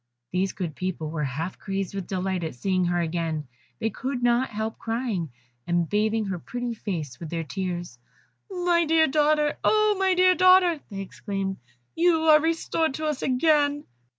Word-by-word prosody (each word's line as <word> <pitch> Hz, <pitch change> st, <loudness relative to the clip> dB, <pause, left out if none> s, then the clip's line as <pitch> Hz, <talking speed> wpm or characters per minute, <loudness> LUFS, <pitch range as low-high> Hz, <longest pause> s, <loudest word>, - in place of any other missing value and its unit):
These 185 Hz, +1 st, 0 dB
good 170 Hz, -6 st, -4 dB
people 170 Hz, -4 st, -3 dB
were 155 Hz, -2 st, -2 dB
half 155 Hz, +7 st, -4 dB
crazy 195 Hz, -1 st, -3 dB
with 195 Hz, -2 st, -4 dB
delight 185 Hz, -1 st, -2 dB
at 160 Hz, -5 st, -4 dB
seeing 185 Hz, +6 st, 0 dB
her 175 Hz, 0 st, +1 dB
again; 160 Hz, -3 st, -2 dB, 0.3 s
they 225 Hz, -1 st, -1 dB
could 255 Hz, +3 st, -4 dB
not 240 Hz, +2 st, +3 dB
help 220 Hz, +1 st, -4 dB
crying, 225 Hz, -, -2 dB, 0.4 s
and 175 Hz, -1 st, +1 dB
bathing 215 Hz, +2 st, +1 dB
her 190 Hz, -3 st, -3 dB
pretty 245 Hz, +5 st, -4 dB
face 160 Hz, -, -5 dB
with 165 Hz, -, -7 dB
their 165 Hz, 0 st, -3 dB
tears. 175 Hz, -6 st, -5 dB, 0.5 s
"My 355 Hz, -2 st, +2 dB
dear 320 Hz, 0 st, +4 dB
daughter! 300 Hz, 0 st, +2 dB
my 415 Hz, -3 st, +3 dB
dear 370 Hz, 0 st, +6 dB
child!" 365 Hz, -3 st, +5 dB
they 195 Hz, -2 st, -5 dB
exclaimed, 195 Hz, 0 st, -4 dB, 0.4 s
"you 335 Hz, -1 st, +3 dB
are 305 Hz, -1 st, +6 dB
restored 325 Hz, -2 st, 0 dB
to 310 Hz, -, -4 dB
us 300 Hz, -3 st, -1 dB
again." 290 Hz, +2 st, +2 dB
220 Hz, 165 wpm, -25 LUFS, -, 0.5 s, dear